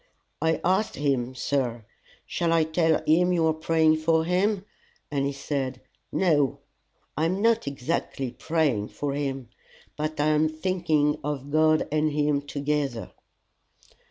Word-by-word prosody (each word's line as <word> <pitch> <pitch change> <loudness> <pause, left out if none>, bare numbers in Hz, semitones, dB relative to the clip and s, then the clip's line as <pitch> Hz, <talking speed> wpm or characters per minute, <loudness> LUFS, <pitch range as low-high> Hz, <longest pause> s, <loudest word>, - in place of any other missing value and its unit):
"I 160 0 +1
asked 190 +4 +1
him, 130 -3 -1
sir 125 -4 -1 0.4
'Shall 170 -1 0
I 165 -1 +4
tell 160 0 +1
him 175 +4 +4
you 165 -2 +2
are 160 - +3
praying 160 0 +2
for 160 0 +2
him?' 190 +3 +1 0.5
and 140 -1 0
he - - -1
said, 135 -2 -3 0.3
'No. 150 -8 +2 0.6
I 155 - +1
am 185 +4 0
not 230 -4 +2
exactly 135 -2 -3
praying 135 -6 0
for 145 +4 -4
him, 135 -4 -3 0.5
but 155 0 -3
I 150 +1 +3
am 155 +1 +3
thinking 155 -3 0
of 145 -1 -4
God 155 0 +3
and 155 0 +1
him 145 -1 +1
together. 145 -3 -2
155 Hz, 140 wpm, -26 LUFS, 140-165 Hz, 0.6 s, I